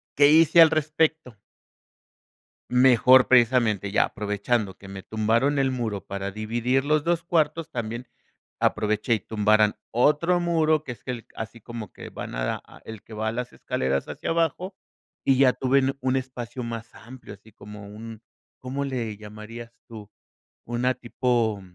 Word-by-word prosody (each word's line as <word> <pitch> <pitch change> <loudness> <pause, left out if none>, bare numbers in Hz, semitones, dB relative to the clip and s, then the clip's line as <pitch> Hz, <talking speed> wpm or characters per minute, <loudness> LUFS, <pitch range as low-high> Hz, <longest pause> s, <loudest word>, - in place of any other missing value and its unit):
¿qué 145 0 +6
hice 165 +2 +5
al 160 - +7
respecto? 155 -5 0 1.3
Mejor 125 0 +6
precisamente, 120 -5 +3
ya 100 - +3
aprovechando 105 0 -2
que 95 - -13
me 95 0 -8
tumbaron 115 +7 +1
el 135 -1 +2
muro 110 -7 -3
para 100 0 -4
dividir 120 +6 -1
los 150 0 +1
2 170 0 +1
cuartos, 165 -2 0
también 120 +1 -5 0.5
aproveché 110 +2 +1
y 110 - -2
tumbaron 110 +1 +2
otro 150 +8 +2
muro, 160 -3 +1
que 125 - -5
es 120 - -14
que 120 -3 -5
así 115 +1 -7
como 115 -2 -8
que - - -10
van - - -7
a - - -2 0.2
el 110 -2 -9
que 115 - -16
va 110 +1 -2
a - - -2
las 125 +1 -5
escaleras 65 +1 -2
hacia - - -5
abajo 170 +3 -1 0.5
y 135 - +3
ya 135 -2 +5
tuve 130 +2 +2 0.2
un 130 +1 0
espacio 125 -1 -5
más 115 0 -7
amplio, 120 -2 -12
así 105 +2 -19
como 105 0 -11
un 110 +2 -10 0.4
¿cómo 135 +2 -4
le 120 -6 -3
llamarías 110 +3 -10 0.2
tú?, 105 -3 -11 0.6
una 120 +2 0
tipo 120 -4 -1
120 Hz, 155 wpm, -25 LUFS, 110-135 Hz, 1.3 s, al